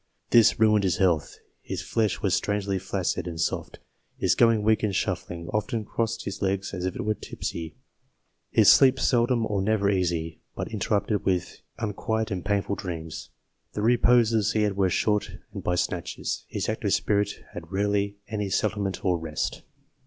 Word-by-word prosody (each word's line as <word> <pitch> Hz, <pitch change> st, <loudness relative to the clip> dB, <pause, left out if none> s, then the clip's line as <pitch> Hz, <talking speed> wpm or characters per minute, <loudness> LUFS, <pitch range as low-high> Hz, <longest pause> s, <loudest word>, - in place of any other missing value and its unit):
This 115 Hz, -3 st, +6 dB
ruined 105 Hz, -2 st, +4 dB
his 90 Hz, -5 st, +1 dB
health. 85 Hz, -6 st, +1 dB
" -, -, -42 dB
His -, -, -5 dB
flesh 110 Hz, -4 st, 0 dB
was 95 Hz, -3 st, +2 dB
strangely 100 Hz, -1 st, 0 dB
flaccid 95 Hz, -1 st, -2 dB
and 85 Hz, -2 st, -5 dB
soft; -, -, -2 dB, 0.4 s
his -, -, +2 dB
going 115 Hz, -2 st, +4 dB
weak 110 Hz, +1 st, +3 dB
and 105 Hz, -3 st, 0 dB
shuffling, 85 Hz, -1 st, -3 dB
often 110 Hz, +1 st, -2 dB
crossing 115 Hz, +1 st, -2 dB
his 100 Hz, 0 st, -5 dB
legs 95 Hz, 0 st, -1 dB
as 90 Hz, -1 st, -2 dB
if 95 Hz, -, -4 dB
he 120 Hz, -, -3 dB
were 110 Hz, 0 st, +1 dB
tipsy; 80 Hz, -5 st, -6 dB, 0.7 s
his -, -, +4 dB
sleep 135 Hz, -1 st, +5 dB
seldom 120 Hz, -1 st, +2 dB
or 105 Hz, -3 st, -1 dB
never 100 Hz, 0 st, +2 dB
easy, 85 Hz, -4 st, -1 dB
but -, -, -4 dB
interrupted 105 Hz, 0 st, 0 dB
with 90 Hz, -2 st, -1 dB, 0.2 s
unquiet 110 Hz, 0 st, -2 dB
and 90 Hz, -2 st, -3 dB
painful 100 Hz, 0 st, 0 dB
dreams 80 Hz, -5 st, -6 dB, 0.4 s
the 105 Hz, -, -3 dB
reposes 115 Hz, -2 st, +4 dB
he 110 Hz, -, +2 dB
had 105 Hz, -2 st, 0 dB
were 95 Hz, -1 st, +2 dB
short 105 Hz, 0 st, 0 dB, 0.2 s
and 100 Hz, -3 st, -6 dB
by 90 Hz, -, +1 dB
snatches; 90 Hz, -1 st, -3 dB
his -, -, -3 dB
active -, -, -1 dB
spirit 105 Hz, 0 st, +1 dB, 0.2 s
had 80 Hz, +2 st, -9 dB
rarely 100 Hz, +1 st, 0 dB
any 105 Hz, -2 st, -3 dB
settlement 100 Hz, 0 st, -1 dB
or 90 Hz, -2 st, +2 dB
rest." 80 Hz, -2 st, -3 dB
100 Hz, 170 wpm, -26 LUFS, 90-110 Hz, 0.7 s, This